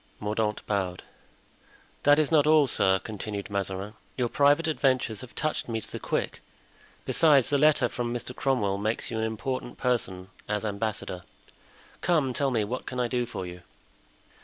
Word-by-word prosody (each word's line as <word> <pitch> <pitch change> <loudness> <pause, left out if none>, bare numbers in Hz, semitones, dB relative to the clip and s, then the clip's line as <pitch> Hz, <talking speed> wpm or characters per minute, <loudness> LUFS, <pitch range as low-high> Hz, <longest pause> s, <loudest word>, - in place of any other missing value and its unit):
Mordaunt 105 0 -1
bowed. 95 -3 -2 1.0
"That 145 0 +6
is 155 -1 +2
not 150 -2 +5
all, 155 -1 +6
sir," 95 -7 +3
continued 105 0 -6
Mazarin; 100 +1 -3 0.2
"your 125 -2 +1
private 145 +5 +4
adventures 130 -7 +1
have 130 -2 -11
touched 155 -5 -2
me 115 -1 -1
to - - -9
the - - -5
quick; - - -2 0.6
besides, 145 -6 +4
the 145 - +3
letter 150 -4 +5
from 120 0 -3
Mr. 120 +1 -5
Cromwell 105 -8 0
makes 110 +4 -1
you 110 - -2
an - - 0
important 120 +3 -4
person 95 -7 -1 0.2
as 105 +1 -1
ambassador; 100 -3 -3 0.8
come, 150 -7 +2
tell 140 +1 +1
me, 115 -4 +1
what 120 +5 -4
can 125 - -4
I 125 - +2
do 120 0 -1
for 95 -5 -5
you?" 90 0 -8
120 Hz, 165 wpm, -27 LUFS, 105-135 Hz, 1.0 s, That